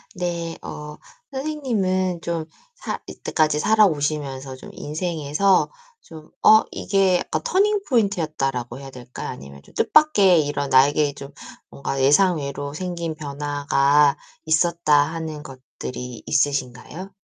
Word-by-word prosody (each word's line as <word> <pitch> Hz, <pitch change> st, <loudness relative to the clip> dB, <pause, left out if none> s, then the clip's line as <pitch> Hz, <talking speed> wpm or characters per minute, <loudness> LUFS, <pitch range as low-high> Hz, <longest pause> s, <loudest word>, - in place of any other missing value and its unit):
네. 170 Hz, -2 st, -3 dB
어. 150 Hz, 0 st, -8 dB, 0.4 s
선생님은 215 Hz, -, -1 dB
좀 170 Hz, -2 st, -3 dB, 0.3 s
살 -, -, -4 dB
이때까지 155 Hz, -2 st, 0 dB
살아오시면서 145 Hz, -10 st, +1 dB
좀 130 Hz, -, -12 dB
인생에서 160 Hz, +3 st, 0 dB, 0.3 s
좀 155 Hz, -, -13 dB
'어, 220 Hz, 0 st, +8 dB
이게 195 Hz, -2 st, +2 dB
약간 -, -, -3 dB
터닝포인트였다.'라고 200 Hz, -, 0 dB
해야 135 Hz, -1 st, -10 dB
될까요? 125 Hz, -1 st, -8 dB
아니면 70 Hz, +1 st, -10 dB
좀 -, -, -20 dB
뜻밖의 195 Hz, -, +4 dB
이런 145 Hz, -1 st, -2 dB
'나에게 145 Hz, +2 st, +4 dB
좀 140 Hz, 0 st, -9 dB, 0.4 s
뭔가 135 Hz, 0 st, -4 dB
예상외로 145 Hz, -1 st, +2 dB
생긴 170 Hz, -2 st, -4 dB
변화가 145 Hz, -1 st, +2 dB, 0.3 s
있었다.' 160 Hz, 0 st, +2 dB, 0.2 s
하는 160 Hz, -2 st, -5 dB
것들이 130 Hz, -3 st, -8 dB
있으신가요? 145 Hz, +5 st, -1 dB
155 Hz, 280 characters per minute, -22 LUFS, 140-185 Hz, 0.4 s, 어